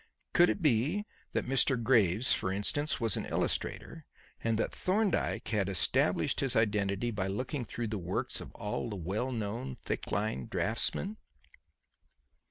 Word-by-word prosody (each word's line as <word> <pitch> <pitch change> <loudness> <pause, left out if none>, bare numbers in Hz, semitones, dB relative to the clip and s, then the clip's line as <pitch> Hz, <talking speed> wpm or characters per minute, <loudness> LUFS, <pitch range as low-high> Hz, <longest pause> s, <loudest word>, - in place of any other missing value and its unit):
Could 175 0 +6
it 190 - -1
be 150 - +2 0.3
that - - 0
Mr. 130 0 +3
Graves, 115 -2 +3
for 95 - 0
instance, 145 +10 0
was 115 -4 +2
an - - -3
illustrator, - - -2 0.4
and 115 -1 +1
that - - -1
Thorndyke 200 +2 0
had 100 -4 +1
established 95 -5 +2
his 135 -3 +1
identity 105 0 +1
by 100 -3 -2
looking 125 +6 -2
through 115 -1 -4
the 105 -2 -2
works 90 +1 -2
of - - -9
all 105 +3 -3
the 105 - -4
well 100 +8 -2
known 105 - -3
thick - - -3
line 100 - -1
draughtsmen? 175 - -1
110 Hz, 150 wpm, -32 LUFS, 100-130 Hz, 0.4 s, Could